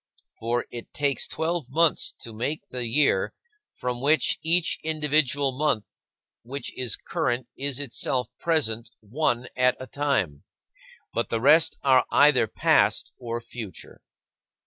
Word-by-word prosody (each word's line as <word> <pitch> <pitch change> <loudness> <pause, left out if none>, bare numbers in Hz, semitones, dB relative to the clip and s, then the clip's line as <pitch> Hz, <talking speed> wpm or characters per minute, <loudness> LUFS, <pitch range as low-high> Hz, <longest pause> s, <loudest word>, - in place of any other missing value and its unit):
For 120 +2 -1
it 120 - -8
takes 145 -2 0
twelve 160 -3 -2
months 160 +3 +2
to 115 - -8
make 130 +8 -3
the 125 -2 -3
year, 140 +6 +2 0.3
from 125 -1 -4
which 150 +3 +2
each 170 +1 +2
individual 150 -3 +1
month 135 -7 -2 0.3
which 135 +4 -6
is 125 -2 -1
current 130 -8 -2
is 140 -1 -1
itself 130 -1 0
present 120 -9 0
one 120 +2 -1
at 125 0 +3
a 130 - -6
time, 130 - -1 0.7
but - - -1
the 115 - 0
rest 150 +6 +5
are 130 -2 +4
either 145 -5 +5
past - - +2
or 120 -1 -4
future. 110 -7 -9
130 Hz, 130 wpm, -25 LUFS, 120-150 Hz, 0.7 s, rest